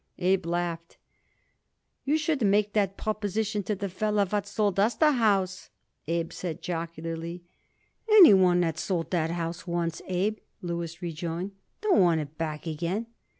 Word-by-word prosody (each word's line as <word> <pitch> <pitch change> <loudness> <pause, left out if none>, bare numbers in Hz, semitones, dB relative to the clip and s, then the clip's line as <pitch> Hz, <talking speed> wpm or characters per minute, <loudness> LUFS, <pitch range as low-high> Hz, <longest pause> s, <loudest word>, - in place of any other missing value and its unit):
Abe 185 0 +1
laughed. 170 -1 -3 1.1
"You 295 +3 +2
should 305 -3 -1
make 205 0 +2
that 200 -2 +1
proposition 215 0 -1
to 205 +2 -2
the 200 +1 -3
feller 210 +2 0
what 200 +1 -2
sold 200 -2 0
us 215 +4 +3
the 310 -1 +4
house," 195 -7 +1 0.4
Abe 165 0 -1
said 170 -4 -5
jocularly. 165 0 -5 0.7
"Any 405 - +9
one 180 -2 +5
what 165 -3 -1
sold 175 -4 -2
that 165 -3 +1
house 170 +1 -4
once, 170 -1 -2
Abe," 195 +4 0 0.2
Louis 170 -1 -4
rejoined, 170 +3 -4 0.3
"don't 420 - +3
want 170 -3 +4
it 150 0 -6
back 155 -1 -4
again." 170 +7 -2
180 Hz, 150 wpm, -27 LUFS, 170-205 Hz, 1.1 s, Any